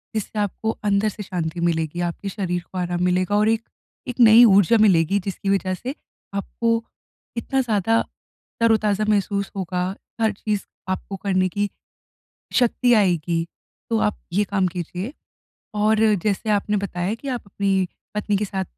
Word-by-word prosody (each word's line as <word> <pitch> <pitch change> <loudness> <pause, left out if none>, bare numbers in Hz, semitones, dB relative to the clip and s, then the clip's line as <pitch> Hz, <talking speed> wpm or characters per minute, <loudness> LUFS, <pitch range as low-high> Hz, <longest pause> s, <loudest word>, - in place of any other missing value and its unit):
जिससे 215 0 -3
आपको 210 +2 -1 0.2
अंदर 200 +2 +2
से 210 +1 -7
शांति 170 -2 -3
मिलेगी, 165 -1 0
आपके 175 +3 -3
शरीर 180 -3 -2
को 185 - -6
आराम 175 0 -1
मिलेगा 180 +2 +1
और 210 +1 +3
एक, 225 0 +2 0.5
एक 250 0 -5
नई 230 +1 +9
ऊर्जा 200 +2 +5
मिलेगी, 195 -1 +4
जिसकी 195 +1 -4
वजह 190 -1 +1
से 255 +9 -5 0.4
आपको 230 +3 -1 0.5
इतना 265 +3 0
ज़्यादा 225 -1 +2 0.6
तरोताज़ा 215 -2 +2
महसूस 200 -1 0
होगा, 180 -2 -2 0.4
हर 220 -1 +3
चीज़ 210 -1 -2 0.3
आपको 190 +1 -3
करने 185 -1 +1
की 205 +2 -1 0.9
शक्ति 245 0 +3
आएगी, 170 -5 +2 0.4
तो 225 -1 +2
आप 210 - 0
ये 205 +2 +3
काम 195 -2 0
कीजिए। 180 - -5 0.6
और 215 +1 +2 0.3
जैसे 210 +1 0
आपने 210 0 +1
बताया 195 0 -2
कि 275 +5 -8
आप 250 -2 -2
अपनी 195 -2 0 0.3
पत्नी 210 -1 0
के 210 - 0
साथ 190 -1 -3
200 Hz, 155 wpm, -22 LUFS, 185-215 Hz, 0.9 s, नई